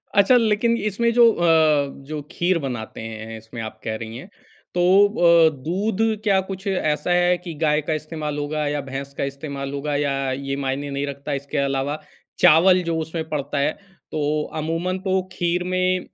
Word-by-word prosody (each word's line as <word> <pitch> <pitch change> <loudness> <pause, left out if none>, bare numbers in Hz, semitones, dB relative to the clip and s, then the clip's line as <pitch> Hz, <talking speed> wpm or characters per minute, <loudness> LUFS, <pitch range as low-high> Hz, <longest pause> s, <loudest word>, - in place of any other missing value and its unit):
अच्छा, 200 +5 +6
लेकिन 230 +1 +2
इसमें 215 +3 0
जो 235 -1 +7
अ, 175 - -2 0.6
जो 155 -1 -4
खीर 175 0 +1
बनाते 120 -6 -5
हैं 110 0 -7
इसमें 110 +1 -9
आप 110 0 -7
कह 110 0 -2
रही 115 +1 -7
हैं 180 +10 -10 0.5
तो 175 - +2 0.3
अ, 170 -5 +5
दूध 195 +6 -1 0.2
क्या 195 -3 +3
कुछ 195 +1 -6
ऐसा 175 -2 0
है 175 0 +3
कि 175 -2 -8
गाय 150 -1 +3
का 155 +2 -2
इस्तेमाल 155 -1 -4
होगा 150 +1 -2
या 145 0 -1
भैंस 135 +1 -6
का - - -1
इस्तेमाल 140 -1 -6
होगा 145 +1 -2
या 135 -2 0
ये 135 +1 -3
मायने 140 +2 -2
नहीं 140 +1 -2
रखता? 140 +1 -5
इसके 140 +2 -4
अलावा 140 +2 -1 0.4
चावल 180 +4 +6
जो 165 -1 -1
उसमें 160 0 -4
पड़ता 145 -1 -3
है, 140 - +2 0.4
तो 150 0 0
अमूमन 165 +4 -2
तो 190 0 0
खीर 175 0 -1
में 185 0 +1
155 Hz, 180 wpm, -22 LUFS, 140-180 Hz, 0.6 s, जो